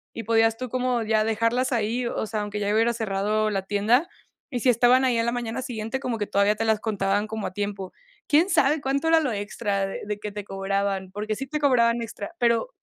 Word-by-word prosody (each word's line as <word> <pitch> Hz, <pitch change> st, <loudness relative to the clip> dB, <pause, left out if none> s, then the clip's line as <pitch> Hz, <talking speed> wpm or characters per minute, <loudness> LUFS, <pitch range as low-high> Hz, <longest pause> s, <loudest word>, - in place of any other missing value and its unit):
y 230 Hz, -, -5 dB
podías 225 Hz, 0 st, +3 dB
tú 255 Hz, 0 st, -5 dB
como 250 Hz, 0 st, 0 dB
ya 220 Hz, -1 st, +2 dB
dejarlas 230 Hz, +4 st, 0 dB
ahí, 235 Hz, +1 st, 0 dB
o 230 Hz, -, -2 dB
sea, 215 Hz, -1 st, -2 dB
aunque 210 Hz, 0 st, -4 dB
ya 205 Hz, 0 st, 0 dB
hubiera 225 Hz, +2 st, +3 dB
cerrado 215 Hz, 0 st, 0 dB
la 195 Hz, -2 st, -2 dB
tienda, 210 Hz, -, +2 dB, 0.4 s
y 250 Hz, -, -2 dB
si 250 Hz, -, +2 dB
estaban 245 Hz, +2 st, +4 dB
ahí 250 Hz, -3 st, +2 dB
a 230 Hz, -, +2 dB
la 235 Hz, -, 0 dB
mañana 240 Hz, +1 st, -3 dB
siguiente, 225 Hz, +1 st, -4 dB
como 245 Hz, -4 st, -3 dB
que 205 Hz, -, -2 dB
todavía 200 Hz, +1 st, +2 dB
te 225 Hz, +2 st, -2 dB
las 220 Hz, -1 st, +2 dB
contaban 205 Hz, -1 st, 0 dB
como 220 Hz, -1 st, -4 dB
a -, -, -6 dB
tiempo. 200 Hz, -1 st, -4 dB, 0.4 s
Quién 315 Hz, +5 st, +4 dB
sabe 290 Hz, +4 st, +3 dB
cuánto 280 Hz, +3 st, -1 dB
era 325 Hz, 0 st, +5 dB
lo 290 Hz, -6 st, -1 dB
extra 205 Hz, -1 st, -2 dB
de 195 Hz, -, -6 dB
de 210 Hz, 0 st, -4 dB
que 210 Hz, 0 st, -5 dB
te 205 Hz, 0 st, -6 dB
cobraban, 195 Hz, -1 st, -2 dB
porque 210 Hz, +2 st, -3 dB
sí 270 Hz, +5 st, -6 dB
te 300 Hz, +3 st, -3 dB
cobraban 240 Hz, -5 st, +3 dB
extra, 230 Hz, -, -7 dB
pero, 235 Hz, -, +2 dB
225 Hz, 230 wpm, -25 LUFS, 205-245 Hz, 0.4 s, era